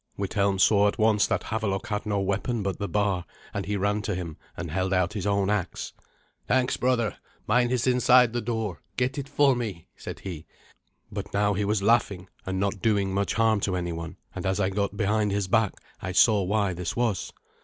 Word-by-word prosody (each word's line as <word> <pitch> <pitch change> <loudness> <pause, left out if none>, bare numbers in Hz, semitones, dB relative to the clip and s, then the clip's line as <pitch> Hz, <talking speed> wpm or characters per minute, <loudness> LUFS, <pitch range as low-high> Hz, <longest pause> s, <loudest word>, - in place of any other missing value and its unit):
Withelm 100 0 0
saw 100 +1 +5
at 105 - -1
once 110 -1 +3
that - - 0
Havelok 105 -3 -2
had 105 0 -3
no 100 -1 +1
weapon 100 +4 -1
but 95 -2 -2
the 100 - -2
bar, 100 -1 0 0.3
and 100 -1 -3
he 105 0 0
ran 105 +2 0
to 105 -1 -2
him 85 -3 -5 0.2
and 85 - -5
held 95 +3 0
out 90 +1 +1
his 105 -2 -3
own 100 0 +2
axe. 105 -4 -2 0.5
"Thanks, 130 0 +2
brother. 120 -4 0 0.3
Mine 125 -1 +3
is 125 -1 0
inside 125 -1 +5
the 120 - -1
door. 110 -7 -3 0.2
Get 130 +3 0
it 140 0 -6
for 140 -2 +4
me," 105 -9 -4
said - - -8
he; 85 -5 -7 0.6
but - - -5
now 105 0 +3
he 100 +1 -1
was 105 -1 0
laughing, 100 -4 +2 0.2
and 95 +1 0 0.2
doing 100 -2 +2
not - - -4
much 100 +1 0
harm 110 -1 +3
to 95 -2 -1
anyone, 85 0 -4 0.2
and 90 - -5
as 95 +2 0
I 95 -1 +1
got 100 +1 -1
behind 105 0 +1
his 100 -1 0
back 110 0 +2 0.3
I 95 - -4
saw 105 0 +5
why 100 0 +1
this 90 +6 -4
was. 120 -5 -1
100 Hz, 205 wpm, -26 LUFS, 95-110 Hz, 0.6 s, saw